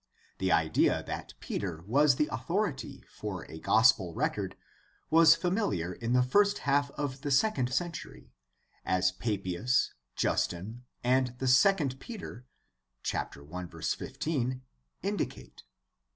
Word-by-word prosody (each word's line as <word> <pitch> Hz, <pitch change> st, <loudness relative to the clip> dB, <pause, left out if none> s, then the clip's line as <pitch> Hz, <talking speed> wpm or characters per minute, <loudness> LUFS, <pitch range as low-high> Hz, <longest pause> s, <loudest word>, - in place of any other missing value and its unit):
The 95 Hz, 0 st, +1 dB
idea 80 Hz, -1 st, +3 dB
that -, -, -6 dB
Peter 85 Hz, -5 st, -4 dB
was 140 Hz, +5 st, +4 dB
the 150 Hz, -, +1 dB
authority 175 Hz, -6 st, -2 dB
for -, -, -6 dB
a 80 Hz, -, -9 dB
gospel 110 Hz, -7 st, +4 dB
record -, -, -2 dB, 0.5 s
was 165 Hz, 0 st, +8 dB
familiar 165 Hz, -, -1 dB
in 115 Hz, +5 st, -2 dB
the 125 Hz, 0 st, +5 dB
first 200 Hz, +10 st, +3 dB
half 140 Hz, 0 st, +2 dB
of 135 Hz, -2 st, -3 dB
the 145 Hz, -, -3 dB
second 135 Hz, -, +2 dB
century, 170 Hz, +5 st, -4 dB, 0.5 s
as 90 Hz, 0 st, +2 dB
Papias, 100 Hz, +4 st, 0 dB, 0.2 s
Justin, 110 Hz, +8 st, -1 dB, 0.2 s
and 125 Hz, 0 st, +2 dB
the 130 Hz, -, -3 dB
II 135 Hz, 0 st, +4 dB
Peter 135 Hz, -, -8 dB, 0.6 s
(1:15) 90 Hz, -, -3 dB, 0.4 s
indicate. -, -, -4 dB
125 Hz, 110 wpm, -30 LUFS, 95-150 Hz, 0.6 s, was